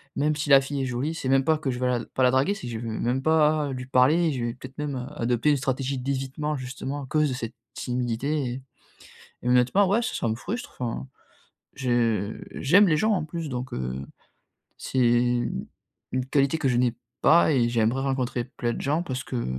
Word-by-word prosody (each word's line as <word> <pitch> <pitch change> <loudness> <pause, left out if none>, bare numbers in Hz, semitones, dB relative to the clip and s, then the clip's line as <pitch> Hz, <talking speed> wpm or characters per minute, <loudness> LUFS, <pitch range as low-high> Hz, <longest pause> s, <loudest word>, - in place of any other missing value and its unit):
Même 150 +2 +1
si 150 0 -3
la 135 -1 +8
fille 140 +1 -3
est - - -1
jolie, 130 +5 -2
c'est 130 - -3
même 135 0 +4
pas 160 -1 +3
que 145 - -2
je 125 - -4
vais 130 - 0
la 125 -2 0
pas 130 - -1
la 125 - +5
draguer, 135 +10 +2
c'est 195 - -8
que 120 - -5
je 110 - -4
vais 115 - -5
même 125 +3 0
pas 155 -2 +3
lui 125 -1 -5
parler. 150 +6 +4
Je 125 -3 -2
vais 120 - -2
peut-être 130 +1 -11
même, 150 -2 -2
heu, 125 - -4 0.2
adopter 120 +5 +2
une 145 - +3
stratégie 135 0 -2
d'évitement, 135 +3 -2
justement, 135 +2 -5
à - - -9
cause 155 +1 +2
de - - -2
cette 115 -3 -6 0.2
timidité 125 +4 -1
et 130 - -6 0.8
et, 125 - 0
honnêtement, 125 +11 +4
ouais, 205 +5 +2
ç 245 - -3
ça - - -1
me 110 - 0
frustre, 225 - -6
enfin. 125 +2 -3 0.7
Je 115 -5 0 0.2
j'aime 195 +9 +5
les 155 -3 +3
gens, 215 +7 +2
en 180 -6 -1
plus, 165 +1 -5
donc, 125 0 -4
heu, 65 +1 -3 0.8
c'est 130 - -3 1.1
une 130 0 -1
qualité 140 +1 +3
que 140 - +1
je 125 - +1
n'ai 120 -1 +2 0.3
pas 170 0 +5
et 120 -3 +3
j'aimerais 120 +2 +1
rencontrer 130 -3 -1
plein 120 -2 -3
de - - -5
gens, 150 +4 0
parce 130 -5 -4
que, 125 -2 -3
130 Hz, 215 wpm, -26 LUFS, 125-150 Hz, 1.1 s, la